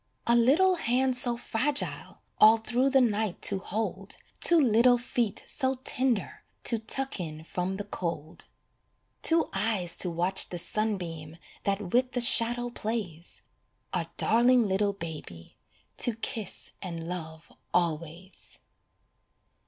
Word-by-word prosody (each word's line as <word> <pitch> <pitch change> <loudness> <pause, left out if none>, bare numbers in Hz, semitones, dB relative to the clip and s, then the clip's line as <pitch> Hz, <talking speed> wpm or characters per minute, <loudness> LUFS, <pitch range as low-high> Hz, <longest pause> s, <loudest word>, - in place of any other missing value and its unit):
A 235 - +4
little 315 +11 +4
hand 260 -2 +1
so 245 -1 +6
fragile 270 +5 -3 0.2
All 220 +1 +8
through 245 +4 0
the 270 0 +4
night 215 -5 0
to 195 - +2
hold 195 -1 -4 0.2
Two 340 -1 +7
little 245 -2 +4
feet 240 -3 -2
so 265 -2 0
tender 250 -6 -1 0.2
To 230 - +2
tuck 265 +3 -1
in 155 -3 -6
from 180 +3 -3
the 205 - -4
cold. 170 -5 -5 0.7
Two 330 0 +3
eyes 195 -4 +1
to 180 - +5
watch 175 +3 0
the 175 - -5
sunbeam 170 -6 -3 0.3
That 200 -2 -2
with 250 +1 +2
the 245 - 0
shadow 240 0 +3
plays 205 -8 -5 0.5
A - - -1
darling 240 0 +4
little 200 +1 +1
baby 155 - -9 0.4
To 240 - +2
kiss 220 -2 -5
and 170 -3 -6
love 160 -2 -7 0.2
always. 170 +2 -2
215 Hz, 130 wpm, -28 LUFS, 175-245 Hz, 0.7 s, All